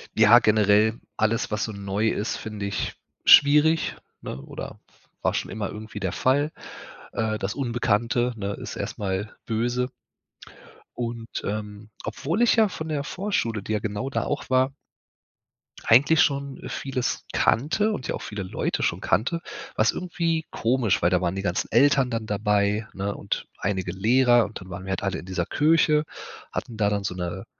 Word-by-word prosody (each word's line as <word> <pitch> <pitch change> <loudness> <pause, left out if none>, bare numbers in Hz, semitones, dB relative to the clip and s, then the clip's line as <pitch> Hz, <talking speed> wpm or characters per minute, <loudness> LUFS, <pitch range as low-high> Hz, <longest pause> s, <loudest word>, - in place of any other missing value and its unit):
Ja, 110 +2 +8
generell 110 0 +3 0.2
alles, 110 +1 +1
was 105 0 -1
so 110 - -5
neu 100 +2 -1
ist, 105 - -2
finde 105 -2 -5
ich 100 - -3 0.3
schwierig, 150 +3 +6 0.3
ne? 65 - -6
Oder - - -8 0.4
war - - +1
schon - - -3
immer 105 -3 -3
irgendwie 110 0 -8
der 95 -3 -1
Fall. 145 +4 +1 0.6
Äh, 110 -1 -1
das 105 0 -3
Unbekannte, 120 -1 0
ne, 100 -1 -3
ist - - -7
erst - - -4
mal 100 +1 -3
böse. 120 +3 -1 1.1
Und, 115 -1 -4 0.2
ähm, 105 0 -5
obwohl 165 +10 -2
ich 240 - +5
ja 220 -2 +5
von 160 -4 -6
der 145 -2 -1
Vorschule, 140 - -2
die 105 - -5
ja 105 - +1
genau 105 +5 -3
da - - -1
auch 145 - -3
war 130 +1 +3 1.1
eigentlich 145 +7 +5
schon 140 -1 0
vieles 130 -2 -3
kannte 175 - +2
und 165 -12 -4
ja - - -1
auch - - -7
viele 105 -2 -5
Leute 90 - -2
schon - - 0
kannte, 165 +10 +1 0.3
war - - +3
es 110 - +4
irgendwie 165 -3 -1
komisch, 115 -3 +1
weil 85 - +4
da 90 0 +2
waren 90 0 0
die 95 - -2
ganzen 90 -2 -2
Eltern 135 +1 +4
dann 115 -1 -3
dabei, 105 +1 +1
ne, 100 +1 -3
und 100 - -3
einige 95 -3 -2
Lehrer, 120 +5 +4
und 105 - -8
dann 95 - -11
waren 95 +1 -7
wir 95 - -4
halt 95 - -2
alle 100 -1 -1
in - - -9
dieser 90 -2 -2
Kirche, 150 0 +3 0.5
hatten 115 - -5
da 105 -1 +2
dann 100 -1 -1
so 90 -2 -3
'ne 90 +1 -4
110 Hz, 175 wpm, -25 LUFS, 100-135 Hz, 1.1 s, Ja